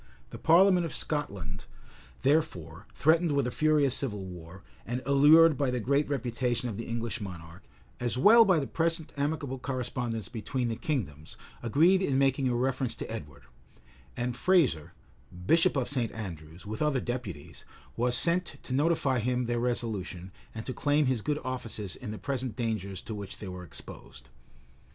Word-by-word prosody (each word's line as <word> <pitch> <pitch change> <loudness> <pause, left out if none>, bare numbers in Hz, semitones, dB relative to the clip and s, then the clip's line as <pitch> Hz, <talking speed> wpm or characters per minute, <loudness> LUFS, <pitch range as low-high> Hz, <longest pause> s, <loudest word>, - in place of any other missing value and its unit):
The - - -8
parliament 180 +2 +5
of 165 - -3
Scotland, 100 - -3 0.6
therefore, 100 - 0
threatened 160 +1 +3
with 140 -2 +1
a 125 - -2
furious 150 -3 +3
civil 105 -9 -1
war, 90 +1 -10 0.2
and 125 +3 -4
allured 150 +4 +6
by 140 -2 +2
the 125 0 -1
great 140 +5 +1
reputation 125 -2 -1
of 110 - -4
the 115 - -6
English 115 -1 -3
monarch, 85 -3 -8 0.4
as 120 0 -2
well 220 - +7
as 225 - +6
by 185 -3 +5
the 145 - 0
present 165 +1 -2
amicable 145 -2 -2
correspondence 125 -4 -3
between 120 +2 -3
the 115 - -2
kingdoms, 90 - -4 0.2
agreed 165 - +4
in 140 -8 +1
making 135 -1 +2
a 120 - 0
reference 130 -1 -1
to - - -7
Edward; 75 -10 -8 0.7
and 120 0 -2
Fraser, 140 - +2 0.5
bishop 165 - +4
of 130 - 0
St. 125 -5 -1
Andrews, 85 -5 -8
with 110 +1 -5
other 150 -3 +2
deputies, 120 - -6 0.3
was 120 +1 +2
sent 175 +1 +1
to 130 - -5
notify 140 -3 +2
to - - -3
him 125 0 0
their 120 0 -1
resolution, 110 -7 -3 0.2
and 110 - -6
to 130 - -4
claim 145 +4 +2
his 130 -4 0
good 150 +6 -1
offices 110 -7 -5
in 125 - -8
the 105 - -5
present 130 -4 -3
dangers 105 -5 -3
to 110 - -6
which 100 -2 -7
they 105 - -8
were 90 -1 -7
exposed. 65 -6 -9
125 Hz, 170 wpm, -29 LUFS, 105-145 Hz, 0.7 s, well